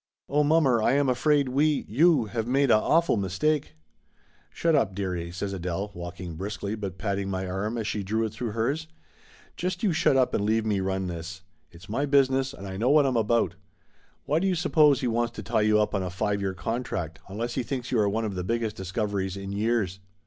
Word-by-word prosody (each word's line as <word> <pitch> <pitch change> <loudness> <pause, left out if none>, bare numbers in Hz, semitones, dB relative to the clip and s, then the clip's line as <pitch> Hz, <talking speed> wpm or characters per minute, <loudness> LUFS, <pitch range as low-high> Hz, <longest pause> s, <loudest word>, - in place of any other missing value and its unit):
Oh, 150 +2 +2
mommer, 145 -6 +3
I 120 - +3
am 140 0 +2
afraid 140 +2 +2
we 145 +3 +1
you 145 - +4
have 115 +1 -3
made 135 +1 +3
a - - +7
awful 165 +5 +3
mistake 145 - 0 0.4
!" - - -36
"Shut 165 -1 +1
up, 100 -10 +2
dearie!" 90 -3 -3
says 95 +3 -4
Adele, 95 +2 -3
walking 85 -1 -7
briskly 100 +2 -4
but 100 -4 -5
patting 100 -1 -2
my 95 -1 -2
arm 100 +5 -2
as 110 - -2
she 105 0 -2
drew 110 +3 -1
it 110 - -5
through 120 -4 -4
hers. 140 +8 -1 0.7
"Just 180 +2 -3
you 195 -5 +2
shut 140 -3 +3
up 130 -1 +2
and - - +1
leave 110 +1 +1
me 105 -3 +1
run 95 0 -1
this. 85 +1 -6 0.3
It's 90 +3 -15
my 135 +7 -1
business 135 -1 +3
and 120 -8 -10
I 95 -1 -6
know 115 +5 +1
what 145 0 +5
I'm 130 -2 +1
about. 115 -3 +2 0.7
Why 150 +3 +2
do 195 - 0
you 185 - +1
suppose 155 -5 +4
he 130 - 0
wants 120 0 0
to 110 - -7
tie 110 +2 +1
you 105 0 +4
up 105 - +1
on 100 - 0
a 90 - -3
five 100 +3 -1
year 95 -1 -2
contract, 90 -6 -3
unless 115 +5 -4
he 130 - -1
thinks 125 +1 -4
you 120 - +2
are 105 -1 +3
one 110 +2 -1
of 105 - -3
the 90 -1 -3
biggest 115 +2 -1
discoveries 95 0 -2
in 100 0 -6
years 100 -2 0
110 Hz, 220 wpm, -26 LUFS, 95-135 Hz, 0.7 s, a